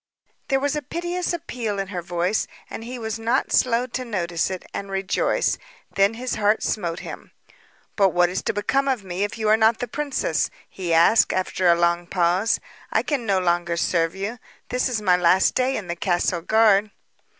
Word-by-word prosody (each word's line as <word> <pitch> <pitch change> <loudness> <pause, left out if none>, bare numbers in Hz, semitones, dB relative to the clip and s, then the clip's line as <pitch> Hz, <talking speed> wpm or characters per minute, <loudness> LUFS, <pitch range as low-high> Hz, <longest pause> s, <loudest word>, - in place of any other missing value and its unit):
There 270 -1 +2
was 285 +2 0
a 300 - -1
piteous 345 +5 -3
appeal 245 - -3
in 195 -1 -3
her 180 -3 -4
voice 175 +4 -1 0.2
and - - -6
he 250 +2 -6
was 220 -2 -4
not 235 +4 0
slow 245 0 +3
to 255 +1 -4
notice 175 -8 -1
it 185 -1 -6
and 200 - -5
rejoice. 195 - 0 0.3
Then 200 +3 +3
his 250 +2 -3
heart 210 0 +2
smote 175 -5 -2
him. - - -9 0.6
"But 195 -2 +4
what 175 -1 +3
is 180 +2 -3
to - - +2
become 270 +7 0
of 255 -6 0
me 185 +1 -3
if 205 - -3
you 220 -1 -1
are 215 - +6
not 220 0 +4
the 245 - -4
princess?" 290 +3 -1 0.2
he 180 -3 -5
asked 170 +7 +5
after 185 0 0
a 170 - +6
long 170 0 +1
pause. 180 +4 +1 0.3
"I - - +2
can 270 -7 -2
no 195 -1 +3
longer 175 -1 0
serve 165 0 +1
you. 205 +5 -4 0.3
This 250 +1 0
is 225 -4 -2
my 180 -2 +4
last 180 +2 +4
day 260 +1 +1
in 205 - -5
the 175 0 -4
castle 175 -1 0
guard." 215 +1 +4
205 Hz, 195 wpm, -23 LUFS, 180-240 Hz, 0.6 s, are